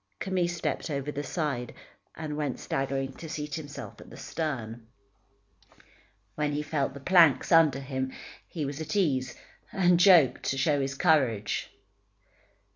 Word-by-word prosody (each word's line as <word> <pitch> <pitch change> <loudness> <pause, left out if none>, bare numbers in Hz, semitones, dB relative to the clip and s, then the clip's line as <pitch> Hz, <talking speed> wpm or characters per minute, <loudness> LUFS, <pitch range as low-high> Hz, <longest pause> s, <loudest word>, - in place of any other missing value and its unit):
Camille 185 -2 0
stepped 175 -1 -3
over 140 0 -3
the 145 - -4
side, 140 -5 -3 0.4
and 155 -2 -5
went 145 -3 -3
staggering 135 0 -2
to 160 - -9
seat 150 -1 -5
himself 145 -3 -7
at - - -13
the - - -12
stern. 120 -8 -4 1.5
When 150 +3 -1
he 150 +1 -1
felt 145 -3 -2
the - - -7
planks 160 -4 +4
under 160 -5 +5
him, 130 -1 -3 0.4
he 155 -4 -4
was 140 +2 -5
at 155 +3 -4
ease, 135 -10 +1 0.4
and 180 -2 +3
joked 175 -8 +6
to 135 - -1
show 145 +1 +2
his 135 0 -2
courage. 130 - +1
145 Hz, 145 wpm, -28 LUFS, 135-160 Hz, 1.5 s, joked